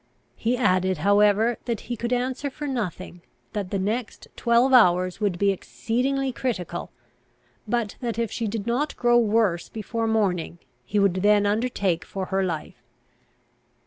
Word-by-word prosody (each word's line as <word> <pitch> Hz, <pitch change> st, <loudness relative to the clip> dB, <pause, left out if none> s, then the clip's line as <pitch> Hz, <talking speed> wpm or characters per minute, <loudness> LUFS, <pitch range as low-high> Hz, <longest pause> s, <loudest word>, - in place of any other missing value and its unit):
He 240 Hz, +2 st, 0 dB
added, 185 Hz, -6 st, +2 dB
however, 205 Hz, +6 st, +3 dB
that 235 Hz, -4 st, -2 dB
he 240 Hz, -, -5 dB
could 235 Hz, +2 st, -4 dB
answer 255 Hz, +3 st, -1 dB
for 295 Hz, +2 st, -7 dB
nothing, 185 Hz, -, -4 dB, 0.3 s
that 200 Hz, -3 st, -3 dB
the 200 Hz, -, -1 dB
next 215 Hz, +5 st, -3 dB
twelve 240 Hz, +3 st, +3 dB
hours 185 Hz, -5 st, +4 dB
would 200 Hz, -4 st, 0 dB
be 200 Hz, +2 st, +3 dB
exceedingly 260 Hz, +7 st, -1 dB
critical, 185 Hz, -9 st, -3 dB, 0.8 s
but 225 Hz, -2 st, -1 dB
that 235 Hz, -3 st, -3 dB
if 230 Hz, -2 st, -1 dB
she 230 Hz, -, -2 dB
did 210 Hz, -1 st, -3 dB
not 250 Hz, +6 st, -1 dB
grow 240 Hz, 0 st, +4 dB
worse 210 Hz, -6 st, +1 dB
before 225 Hz, +1 st, -3 dB
morning, 190 Hz, -7 st, 0 dB, 0.3 s
he 210 Hz, -, -2 dB
would 200 Hz, -3 st, +4 dB
then 205 Hz, +2 st, +4 dB
undertake 205 Hz, -5 st, 0 dB
for 190 Hz, -1 st, -5 dB
her 195 Hz, 0 st, +2 dB
life. 165 Hz, -4 st, -4 dB
215 Hz, 150 wpm, -24 LUFS, 190-240 Hz, 0.8 s, hours